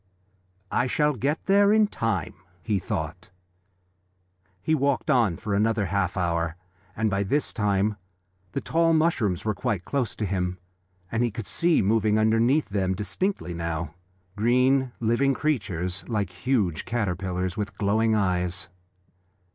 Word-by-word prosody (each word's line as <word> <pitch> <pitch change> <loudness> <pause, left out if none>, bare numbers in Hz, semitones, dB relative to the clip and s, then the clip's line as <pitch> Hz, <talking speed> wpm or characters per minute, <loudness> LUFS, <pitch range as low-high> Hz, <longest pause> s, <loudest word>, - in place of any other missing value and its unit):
"I 125 - +1
shall 150 +3 +2
get 140 +5 -2
there 200 +1 +5
in 215 0 +5
time," 115 - -2 0.3
he 105 -3 0
thought. - - -4 1.3
He 160 - 0
walked 140 -1 +1
on 115 - +3
for 105 - -4
another 105 +1 +2
half 100 0 -1
hour, 85 -2 0 0.4
and 110 +1 +1
by 100 -1 0
this 140 +10 0
time 105 -1 +1 0.6
the - - -2
tall 165 0 +2
mushrooms 135 - +1
were 110 - +1
quite 105 -5 -2
close 130 -6 -1
to 110 - -2
him, 90 -1 -1 0.5
and 115 - 0
he 120 - +2
could 110 0 -6
see 170 - +2
moving 110 +1 +2
underneath 115 +7 +3
them, 95 -2 0
distinctly 105 - -2
now, 85 -1 -3 0.4
green, 125 +4 +3
living 120 +4 +2
creatures 95 - -1
like 105 -6 -1
huge 95 - 0
caterpillars, 95 -5 -2
with 100 -1 -4
glowing 110 +2 +2
eyes. 90 -4 0
105 Hz, 140 wpm, -26 LUFS, 95-130 Hz, 1.3 s, there